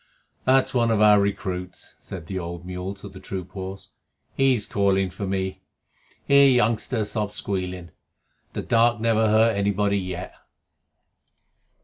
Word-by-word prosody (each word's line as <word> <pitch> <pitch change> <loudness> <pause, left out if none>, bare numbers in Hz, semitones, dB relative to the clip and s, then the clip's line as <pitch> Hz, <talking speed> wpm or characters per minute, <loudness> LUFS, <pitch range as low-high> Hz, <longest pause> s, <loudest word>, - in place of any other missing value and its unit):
"That's 130 0 +3
one 120 -2 +2
of 110 -2 +2
our 105 -1 +6
recruits," 95 -2 -4
said 90 -4 -8
the 95 +2 -4
old 85 0 -6
mule 90 +2 -5
to 100 - -11
the 95 - -11
troop 95 -1 -6
horse. 95 0 -8 0.4
"He's 130 -6 +2
calling 95 -2 +1
for 100 +2 -5
me. 95 0 -3 0.6
Here, 140 0 +6
youngster, 115 -2 +1
stop 105 -1 -3
squealing. 90 -4 -4 0.6
The - - -4
dark 120 0 +3
never 110 -1 +2
hurt 110 +1 +4
anybody 100 0 +1
yet." 90 -1 -6
100 Hz, 135 wpm, -24 LUFS, 95-110 Hz, 0.6 s, our